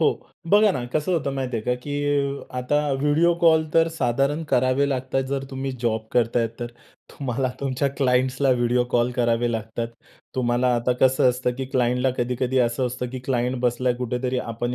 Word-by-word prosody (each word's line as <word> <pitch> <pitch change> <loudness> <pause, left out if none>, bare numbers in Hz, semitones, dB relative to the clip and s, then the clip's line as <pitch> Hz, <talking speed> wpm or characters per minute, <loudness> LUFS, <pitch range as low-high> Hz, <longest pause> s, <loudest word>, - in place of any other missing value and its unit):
हो - - +4 0.4
बघा 210 0 +6
ना, 125 -7 -3
कसं 155 +4 0
होतं 150 -5 0
माहिती 130 -3 -2
आहे 110 - -5
का, 125 - +2
की 145 +1 -2
आता 125 +4 +1 0.2
व्हिडिओ 155 +4 +3
कॉल 160 -2 +5
तर 165 0 +5
साधारण 135 +5 +1
करावे 130 +3 +3
लागतात 130 0 -1
जर 135 -1 -2
तुम्ही 135 0 -3
जॉब 110 -1 0
करताय 115 -1 +2
तर. 120 - -2 0.4
तुम्हाला 130 -1 -2
तुमच्या 135 0 0
क्लायंट्सला 130 0 +2
व्हिडिओ 125 0 +2
कॉल 120 +1 +2
करावे 120 -1 +1
लागतात. 115 +1 -3 0.5
तुम्हाला 125 0 +1
आता 120 +1 +1
कसं 130 -1 +4
असतं 125 0 -1
की 135 - -4
क्लायंटला 125 +1 +2
कधी-कधी 125 +1 0
असं 125 +1 +1
असतं 125 0 -4
की 130 - -5
क्लायंट 125 0 0
बसला 125 0 +1
कुठेतरी, 125 +1 -2
आपण 120 +1 -3
125 Hz, 170 wpm, -23 LUFS, 120-135 Hz, 0.5 s, बघा